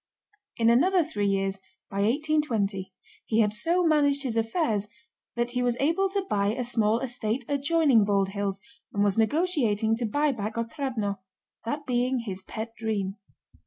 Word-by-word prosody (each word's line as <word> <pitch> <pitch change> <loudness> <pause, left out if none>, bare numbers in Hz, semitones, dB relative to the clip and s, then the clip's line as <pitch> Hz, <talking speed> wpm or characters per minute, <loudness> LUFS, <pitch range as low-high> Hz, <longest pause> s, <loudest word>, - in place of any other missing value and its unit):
In 230 -1 +4
another 350 +9 +4
three 205 -10 -2
years, 195 0 0 0.3
by 195 - -7
1820, 225 -5 0 0.4
he 225 - +1
had 210 -1 +2
so 340 +11 +1
managed 285 -3 +3
his 245 -4 -2
affairs 225 - 0 0.5
that 240 0 -1
he 250 0 -1
was 245 -1 +1
able 335 +7 +2
to 390 0 -2
buy 200 - +1
a 250 - -2
small 225 -2 +1
estate 245 -1 -2
adjoining 285 -4 +3
Bald 200 -1 +1
Hills 200 -1 -3 0.3
and 200 - +1
was 200 -2 +2
negotiating 225 - +1
to 235 -1 -1
buy 290 +6 +1
back 215 -3 -4
Otrádnoe—that 230 +1 -4
being 250 0 +1
his 195 -4 -6
pet 220 +4 -6
dream. 210 -3 -2
230 Hz, 155 wpm, -27 LUFS, 205-285 Hz, 0.5 s, In